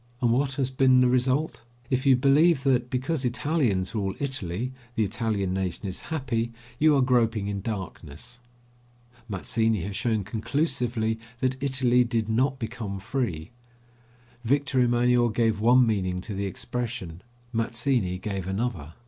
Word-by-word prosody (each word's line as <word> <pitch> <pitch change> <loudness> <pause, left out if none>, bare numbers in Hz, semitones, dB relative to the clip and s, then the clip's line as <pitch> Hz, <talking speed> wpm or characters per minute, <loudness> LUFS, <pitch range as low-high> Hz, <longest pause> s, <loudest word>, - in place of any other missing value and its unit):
And 120 -3 +2
what 135 +3 +1
has 130 -1 -1
been 130 -1 +4
the 125 - +5
result? 130 +4 +1 0.3
If 130 +1 +1
you 135 - +7
believe 140 +3 +4
that, 125 -3 +2
because 130 +4 -1
Italians 125 - 0
rule 100 -3 -2
Italy, 125 -3 -1 0.2
the 110 - +2
Italian 105 -3 -1
nation 95 +1 -3
is 95 - -4
happy, 120 -7 -1 0.3
you 155 -1 +5
are 135 - +4
groping 115 -4 +2
in 100 -1 -3
darkness. 100 +1 -6 0.9
Mazzini 110 +1 0
has 100 +3 -5
shown 110 -1 0
conclusively 115 - -1 0.2
that 130 +1 -1
Italy 130 -3 +3
did 115 -2 -1
not 130 +4 +1
become 110 -5 -5
free. 95 - -3 0.9
Victor 135 +2 +1
Emanuel 120 0 +3
gave 110 -1 +1
one 125 +3 +5
meaning 95 -5 0
to 105 +3 -6
the 100 0 -2
expression; 95 -5 -5 0.3
Mazzini 115 -4 0
gave 95 -1 -4
another. 95 -6 -3
120 Hz, 140 wpm, -26 LUFS, 100-130 Hz, 0.9 s, you